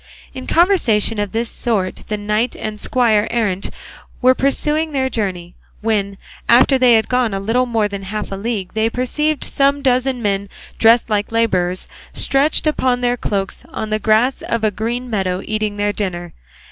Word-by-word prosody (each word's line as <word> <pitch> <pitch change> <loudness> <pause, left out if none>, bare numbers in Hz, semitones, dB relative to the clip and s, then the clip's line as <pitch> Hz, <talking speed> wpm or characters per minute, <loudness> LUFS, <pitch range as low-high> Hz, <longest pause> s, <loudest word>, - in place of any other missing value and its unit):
In 260 - -8
conversation 240 - +3
of 205 -2 -2
this 230 +1 -1
sort 210 -6 -2
the 210 - -2
knight 210 +3 -1
and 215 -1 -5
squire 225 -4 +2
errant 210 -5 -1 0.5
were 255 0 +5
pursuing 300 +4 0
their 260 -1 0
journey, 180 -5 -3 0.3
when, 205 -3 -1 0.3
after 260 +3 +5
they 250 -2 +6
had 220 - +2
gone 250 -5 +1
a - - -2
little 235 +6 +1
more 225 -3 +1
than 200 -1 -6
half 205 +2 -5
a - - -3
league, 200 -2 -4
they 220 +1 +1
perceived 300 +5 -1
some 280 0 +1
dozen 255 0 +1
men 200 -2 -1 0.3
dressed 230 +1 +5
like 205 0 0
labourers 185 -6 0 0.3
stretched 280 +4 +1
upon 260 -5 +1
their 245 0 +1
cloaks 200 -5 -3
on 215 -1 -5
the 215 - +1
grass 220 +5 +2
of 230 -1 -2
a 215 - +2
green 235 +5 -3
meadow 190 -5 -1
eating 215 -1 -2
their 205 0 0
dinner. 175 -4 -4
225 Hz, 170 wpm, -18 LUFS, 205-250 Hz, 0.5 s, they